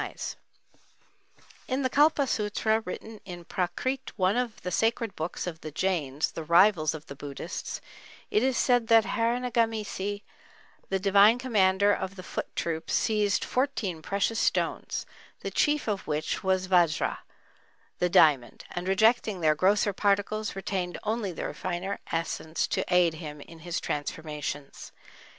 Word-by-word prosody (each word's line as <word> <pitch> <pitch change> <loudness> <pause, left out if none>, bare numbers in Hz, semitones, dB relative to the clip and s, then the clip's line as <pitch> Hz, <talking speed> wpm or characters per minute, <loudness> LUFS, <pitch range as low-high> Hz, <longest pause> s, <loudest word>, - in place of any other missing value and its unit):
In 265 +1 -1
the 260 - +1
Kalpa 295 0 +4
Sutra, 220 -1 0
written 220 +1 -8
in 175 -3 -9
Prakrit, 260 +11 -2
one 190 0 +2
of 245 -2 -2
the 180 - -3
sacred 225 +2 0
books 160 +3 -4
of 165 -3 -6
the 155 - -6
Jains, 155 -4 -1
the 165 - -6
rivals 170 -1 +4
of 155 - -9
the - - -8
Buddhists, 140 0 -6 0.5
it 210 - +3
is 260 -1 +1
said 245 -2 +3
that 225 -1 +6
Harinegamesi, 225 -4 -1 0.7
the 195 - +1
divine 200 +4 +5
commander 205 -5 +3
of 190 0 -3
the 185 - -9
foot - - -5
troops, 165 -1 -2
seized 210 -2 +1
fourteen 230 - -1
precious 200 +5 0
stones, - - 0 0.4
the - - -4
chief 295 -3 +1
of 205 -3 -2
which 155 0 -2
was 190 -1 +1
vajra, 175 -5 +2 0.8
the 180 - +2
diamond, 150 -7 +4
and 175 +1 -4
rejecting 220 0 +3
their 155 -1 +4
grosser 200 +5 +2
particles, 205 +2 0
retained 190 -2 -3
only 215 -2 -1
the 170 - -4
finer 185 +2 -3
essence 165 -1 -1
to - - -1
aid 180 -2 +4
him 150 -2 -8
in 165 +3 -12
his 170 +1 -3
transformations. 150 -1 -5
195 Hz, 140 wpm, -28 LUFS, 170-220 Hz, 0.8 s, that